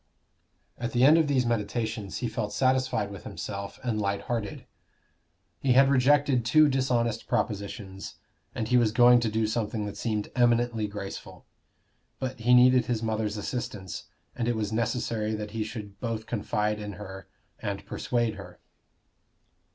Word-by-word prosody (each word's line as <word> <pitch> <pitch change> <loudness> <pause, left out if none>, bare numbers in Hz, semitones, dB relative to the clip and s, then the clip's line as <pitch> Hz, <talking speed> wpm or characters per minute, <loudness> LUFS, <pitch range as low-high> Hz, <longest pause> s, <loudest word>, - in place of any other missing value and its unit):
At 120 0 -3
the 120 0 +3
end 155 +5 +7
of 160 - +2
these 130 -3 +2
meditations 110 -2 -2
he - - +1
felt 110 -2 -3
satisfied 130 -5 +1
with 100 - -9
himself 100 -1 -6
and 115 -4 -1
light 100 0 -1
hearted. 110 -2 -4 0.9
He 130 -2 +2
had 135 +2 +6
rejected 140 -1 +4
two 150 +6 +5
dishonest 125 -4 0
propositions, 100 -2 -3 0.4
and 110 - -2
he 125 +1 +4
was 115 -3 +3
going 120 +1 +6
to 115 -2 0
do 110 +1 0
something 110 -1 -2
that 105 - -6
seemed 105 -3 -2
eminently 120 -2 +2
graceful. 100 -1 -8 0.7
But 130 -1 -4
he 120 +2 +5
needed 125 -1 +6
his 115 -2 -1
mother's 110 -1 -1
assistance, 105 -4 -5 0.3
and 120 - -2
it 120 - +1
was 110 -1 -2
necessary 115 -1 -1
that 105 -1 -5
he 110 0 -2
should 105 -3 -8
both 115 -2 -3
confide 105 -1 -1
in 105 -1 -6
her 95 -2 -9 0.3
and 100 -2 -4
persuade 120 -3 -1
her. - - -11
115 Hz, 155 wpm, -27 LUFS, 105-125 Hz, 0.9 s, end